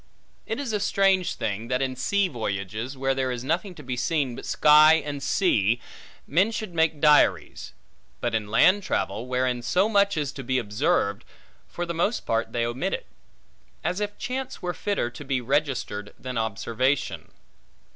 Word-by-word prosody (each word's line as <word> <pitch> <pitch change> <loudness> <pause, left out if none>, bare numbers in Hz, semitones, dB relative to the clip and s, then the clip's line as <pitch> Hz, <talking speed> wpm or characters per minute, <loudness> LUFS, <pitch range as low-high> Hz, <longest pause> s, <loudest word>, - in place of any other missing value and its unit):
It 225 - -3
is 265 -6 -3
a 210 - +1
strange 195 -2 +2
thing, 110 +2 -3
that 125 +1 0
in 130 -1 -1
sea 200 +9 +1
voyages, 110 - -4
where 135 0 +1
there 130 -1 -1
is 125 -1 -4
nothing 175 +6 -2
to 150 - -11
be 125 -1 -3
seen, 135 -1 -1
but - - -8
sky 155 +1 +6
and 145 -3 -3
sea, 120 - +2 0.5
men 185 +9 +2
should 215 -4 -5
make 160 -2 +1
diaries; 150 0 +3 0.5
but 120 - -2
in 110 -2 -1
land 185 - +5
travel, 115 - -2
wherein 125 -1 0
so 185 - +2
much 200 -4 +2
is 145 -3 -1
to 135 - -8
be 130 +1 0
observed, 105 - 0 0.4
for 175 - -4
the 170 - -4
most 175 +8 -1
part 115 0 -1
they 115 -1 0
omit 125 +11 -2
it; - - -9 0.8
as 180 - -1
if 205 0 -3
chance 255 +1 -4
were 180 -1 -3
fitter 200 -14 -2
to 145 - -9
be 135 -2 -1
registered, 125 -6 -2
than 130 0 -6
observation. 115 +4 -1
135 Hz, 175 wpm, -25 LUFS, 120-180 Hz, 0.8 s, sky